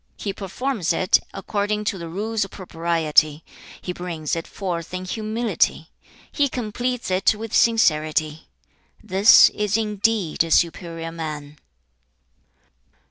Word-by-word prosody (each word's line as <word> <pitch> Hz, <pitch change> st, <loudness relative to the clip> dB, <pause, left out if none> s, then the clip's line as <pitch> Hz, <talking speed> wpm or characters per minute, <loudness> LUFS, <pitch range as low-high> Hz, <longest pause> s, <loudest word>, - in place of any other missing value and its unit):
He 200 Hz, -, -4 dB
performs 195 Hz, -1 st, -2 dB
it 185 Hz, +2 st, +3 dB
according 205 Hz, +2 st, -2 dB
to 205 Hz, -2 st, -2 dB
the 170 Hz, -1 st, -7 dB
rules 215 Hz, +5 st, -2 dB
of 195 Hz, -, -7 dB
propriety. 165 Hz, -4 st, 0 dB, 0.4 s
He 180 Hz, -, -5 dB
brings 170 Hz, -4 st, -4 dB
it 165 Hz, -, -5 dB
forth 175 Hz, -3 st, -5 dB
in 185 Hz, 0 st, -5 dB
humility. 220 Hz, +4 st, -1 dB, 0.4 s
He 285 Hz, -2 st, +1 dB
completes 245 Hz, -1 st, -3 dB
it 185 Hz, +3 st, +3 dB
with 220 Hz, 0 st, -7 dB
sincerity. 155 Hz, -8 st, +2 dB, 0.6 s
This 200 Hz, +1 st, +7 dB
is 210 Hz, 0 st, 0 dB
indeed 210 Hz, -5 st, 0 dB
a 165 Hz, -, -6 dB
superior 165 Hz, 0 st, 0 dB
man.' 150 Hz, -3 st, -6 dB
185 Hz, 120 wpm, -22 LUFS, 165-215 Hz, 0.6 s, This